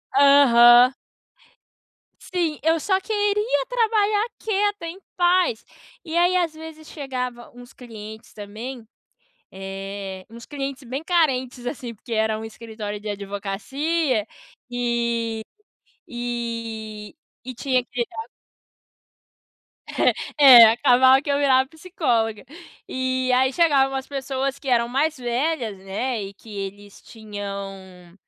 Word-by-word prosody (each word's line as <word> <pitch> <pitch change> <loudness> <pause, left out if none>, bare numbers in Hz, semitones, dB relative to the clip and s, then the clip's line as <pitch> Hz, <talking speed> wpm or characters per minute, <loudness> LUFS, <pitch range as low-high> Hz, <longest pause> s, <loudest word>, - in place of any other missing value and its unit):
Aham. 255 -3 +7 1.3
Sim, 340 -5 -2
eu 325 +1 +2
só 380 -1 +1
queria 415 - 0
trabalhar 435 -3 +2
quieta, 410 -3 -1
em 335 +3 -7 0.2
paz. 350 -9 +2 0.4
E 330 0 -3
aí, 355 +1 +3
às 345 -3 +1
vezes, 315 0 -11
chegava 250 -4 -5
uns 245 0 -13
clientes 220 -3 -11
também, 220 +4 -8 0.7
eh, 195 0 -7
uns 230 0 -12
clientes 275 -2 -5
bem 260 +5 -5
carentes 260 -8 0
assim, 245 -2 -5
porque 230 +2 -12
era 220 0 +1
um 220 - -7
escritório 220 -2 -7
de 215 - -7
advocacia, 210 +9 -2 0.5
eh, 235 -2 -1 0.7
eh, 230 -3 -5 0.3
e 255 0 -7
tinha 255 -2 0
que 240 -1 -3
tra 445 - -8 1.9
É 265 -5 +8
é - - +12
acabava 260 +2 +5
que 290 - -4
eu 280 - +2
virava 265 -2 +3
psicóloga. 245 - -2 0.4
E 260 0 -1
aí, 260 +1 +3
chegavam 275 -4 +3
umas 270 0 -4
pessoas 275 0 -3
que 275 - -9
eram 235 -1 +2
mais 295 +5 0
velhas, 245 -2 -2
né, 210 +5 -3
e 195 0 -8
que 220 - -16
eles 200 +1 -8
tinham, 195 -4 -8
250 Hz, 120 wpm, -23 LUFS, 220-290 Hz, 1.9 s, é